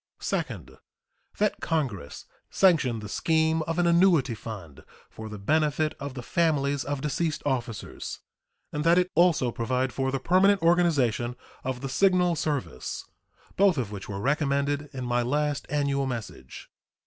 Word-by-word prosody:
Second. - - -4 0.6
That 210 0 +1
Congress 115 - -3 0.2
sanction 150 - +3
the 105 - -7
scheme 160 +6 +1
of 165 - -2
an 175 - +2
annuity 170 -7 +4
fund 100 -10 -9 0.3
for 110 0 -8
the 105 - -7
benefit 155 +7 +1
of 140 -2 -6
the 125 - -6
families 145 -3 +1
of 145 -1 -3
deceased 150 +2 -1
officers, 120 -6 -3 0.6
and 150 - -2
that 170 +2 +5
it 180 0 +2
also 165 -7 +3
provide 125 +2 -1
for 135 0 -1
the 135 - -1
permanent 190 +6 +3
organization 145 - +2 0.3
of 130 -1 -3
the 135 - -3
Signal 180 +2 +3
Service, 145 - -3 0.5
both 195 -4 +4
of 115 -6 -2
which 100 -1 -7
were 100 -1 -4
recommended 140 +2 0
in 130 -3 -5
my 120 0 +1
last 145 +4 -1
annual 140 -2 0
message. 115 - -7
140 Hz, 150 wpm, -27 LUFS, 125-165 Hz, 0.6 s, that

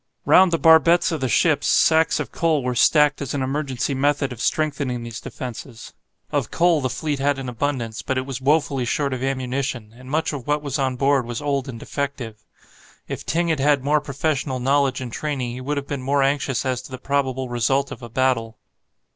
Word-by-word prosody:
Round 185 -1 +6
the 165 - +2
barbettes 165 +2 +5
of 160 - -3
the 130 - 0
ships - - +2
sacks 160 0 +4
of - - -4
coal 160 -5 +1
were 125 0 -1
stacked 150 +4 +4
as 140 0 -3
an 135 - -1
emergency 135 -1 -2
method 140 0 +1
of 120 - -9
strengthening 140 -6 -1
these 115 -1 -7
defences. 120 -2 -8 0.4
Of - - -1
coal 170 -3 +2
the 130 - -1
fleet 150 +1 -3
had 140 0 +1
an 135 -1 -5
abundance, 120 -3 -3
but 130 - -2
it 130 - -1
was 135 -1 -5
woefully 145 -1 +1
short 140 +3 -1
of 130 - -4
ammunition, 130 -3 -3
and 130 +1 -13
much 155 +2 0
of 135 -5 -6
what 150 0 0
was 140 -1 -3
on 130 -2 0
board 135 -1 +2
was 120 -1 -4
old 140 -2 -2
and 115 -3 -7
defective. 125 -6 -5 0.6
If - - -6
Ting 170 +1 0
had 160 -3 +1
had 140 -1 +2
more 150 +2 +2
professional 140 -2 -2
knowledge 135 0 +1
and 120 -3 -6
training, 135 -5 -3
he 125 +2 -7
would 145 +3 -2
have 140 - -3
been 140 -2 -4
more 140 +1 +1
anxious 135 -2 0
as 130 -2 -1
to 130 - -12
the 130 - -6
probable 130 -1 -1
result 125 +3 0
of - - -8
a 120 - -8
battle. 115 -2 0
135 Hz, 210 wpm, -22 LUFS, 125-145 Hz, 0.6 s, Round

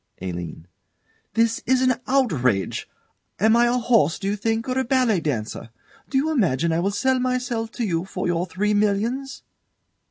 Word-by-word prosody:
ALINE. 85 -3 -6 0.7
This 230 0 +2
is 260 +1 +3
an 255 0 +4
outrage. 150 - +1 0.5
Am 220 +4 +4
I 240 0 +4
a 240 - +2
horse, 225 -10 +3
do 195 - -4
you 205 - 0
think, 225 +3 -1
or 255 - -1
a - - +1
ballet 245 -6 +2
dancer? 115 -6 -3 0.4
Do 270 - 0
you 305 +4 +1
imagine 170 - +1
I 165 - +1
will 190 +3 +1
sell 260 +6 +1
myself 250 -3 -1
to 240 - -2
you 170 -3 -1
for 185 -1 -4
your 175 +1 0
three 205 +4 0
millions? 220 +7 0
220 Hz, 170 wpm, -23 LUFS, 170-250 Hz, 0.7 s, an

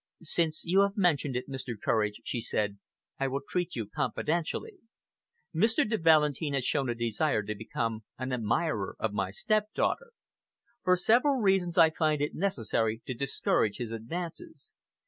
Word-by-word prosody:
"Since 160 -1 +1
you 185 +3 +4
have 200 +2 +1
mentioned 150 -8 +2
it, 125 - -3
Mr. 130 -5 -5
Courage," 105 -1 0
she 120 - -3
said, 105 -2 -1 0.4
"I 135 - +1
will 135 +1 -2
treat 180 -1 -2
you 115 -3 -2
confidentially. 170 - -2 0.7
Mr. 220 +8 +3
de 220 0 0
Valentin 155 -2 +3
has 130 -2 -1
shown 135 -1 0
a 120 - -1
desire 115 +1 0
to 105 - -3
become 110 +1 -3
an 130 +1 -3
admirer 115 -4 0
of 110 -2 -2
my 95 -2 -1
stepdaughter. 215 - -1 0.7
For 185 0 +4
several 245 +9 +4
reasons, 190 -6 +2
I 165 -2 +7
find 155 -2 +1
it 145 +1 -1
necessary 115 - -1
to 130 - -3
discourage 115 -5 0
his 120 -2 -4
advances. 170 - -6
150 Hz, 155 wpm, -29 LUFS, 115-180 Hz, 0.7 s, I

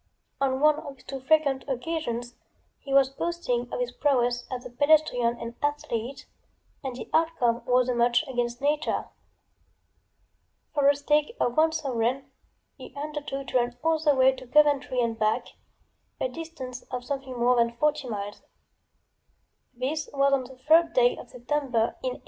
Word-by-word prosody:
On 265 -1 +1
one 305 0 +5
of 285 -3 -8
these - - -21
too 270 - -5
frequent 280 -1 +2
occasions 250 -3 -3 0.5
he 275 - -9
was 270 -1 +5
boasting 270 -6 -2
of - - -3
his 245 0 -1
prowess 245 -3 +1
as 250 -1 -5
a - - -8
pedestrian 265 -4 +3
and 230 0 -6
athlete, 275 -4 -3 0.6
and 260 -2 -4
the 240 - -7
outcome 260 -8 +2
was 250 0 +3
a 250 - +1
match 240 +4 +2
against 245 -2 -2
nature. 295 +1 0 1.6
For 285 -2 +3
a 285 - +6
stake 295 +8 +1
of 240 - +1
one 320 +1 +4
sovereign 270 -3 -1 0.5
he - - -11
undertook 290 -3 -5
to 255 - +2
run 240 0 -1
all 320 0 +2
the 300 -2 +3
way 260 0 +5
to 260 -1 -10
Coventry 285 -2 +3
and 230 -1 -1
back, 215 0 +1 0.7
a - - 0
distance 320 - -7
of 250 -1 -5
something 270 -2 -4
more 245 +1 +4
than 235 0 +2
forty 300 -1 0
miles. 205 -1 -5 1.3
This 270 +5 -3
was 275 0 +2
on 265 -2 +1
the 265 +1 -12
3d 315 +6 +4
day - - +4
of - - -11
September 250 -2 -1
in 255 -1 -2
1873. - - -11
265 Hz, 165 wpm, -27 LUFS, 245-295 Hz, 1.6 s, a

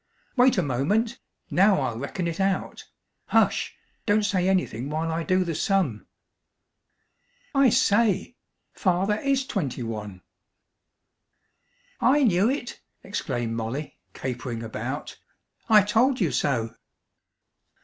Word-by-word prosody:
Wait 250 -2 +4
a 185 - +2
moment. 200 - 0 0.3
Now 195 +2 +4
I'll 120 -4 -2
reckon 155 +7 -4
it 170 +1 -4
out. 195 -1 -1 0.4
Hush! - - +2 0.3
Don't 210 0 +3
say 190 -2 +1
anything 140 - -1
while 160 +2 -2
I 165 +1 -1
do 185 +2 +2
the 170 -2 -3
sum. 160 - 0 1.5
I 275 -2 +5
say! 215 +1 +2 0.4
Father 195 +3 +1
is 275 -1 +1
twenty 145 - -3
one!" 105 -5 -6 1.8
"I 280 +4 +4
knew 200 -1 +3
it!" 260 -3 -4 0.2
exclaimed 120 - -3
Molly, 115 +6 -4 0.2
capering 125 -2 -4
about. 110 - -5 0.5
"I 210 -2 +7
told 240 +6 +2
you 175 -8 +1
so." 115 -5 0
185 Hz, 115 wpm, -25 LUFS, 130-215 Hz, 1.8 s, I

